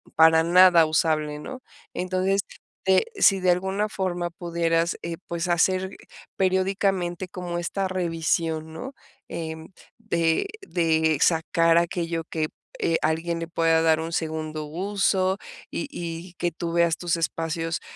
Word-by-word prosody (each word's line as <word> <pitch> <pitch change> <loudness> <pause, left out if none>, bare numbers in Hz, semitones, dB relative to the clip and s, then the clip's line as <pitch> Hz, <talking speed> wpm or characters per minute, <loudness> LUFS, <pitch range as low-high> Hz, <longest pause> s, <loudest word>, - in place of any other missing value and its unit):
para 160 0 +6
nada 175 -1 +7
usable, 155 -1 0
¿no?, 255 +12 -7 0.3
entonces 185 +2 0 0.4
te 190 0 +4
si 195 - +4
de 180 -1 +4
alguna 190 +4 0
forma 180 -3 -2
pudieras, 170 0 0
eh, 165 -1 -5
pues 170 +1 -3
hacer 185 +2 +2 0.5
periódicamente 190 -1 0
como 180 -1 -5
esta 190 +3 -2
revisión, 165 -3 -1
¿no?, 255 +10 -7 0.3
em, 160 -1 -6 0.3
de 170 - 0 0.2
de 160 - +2
sacar 165 0 +3
aquello 170 -1 0
que, 155 -1 -1 0.3
eh, 165 - +1
alguien 165 +2 0
le 165 - -4
pueda 165 -1 +2
dar 160 -1 +3
un 165 +1 -4
segundo 155 -1 -3
uso 190 +3 0 0.3
y 300 - -3
y 170 - -6
que 175 - -1
tú 170 0 -4
veas 170 -1 +3
tus 175 -1 -1
espacios, 165 0 -2
170 Hz, 135 wpm, -25 LUFS, 165-185 Hz, 0.5 s, nada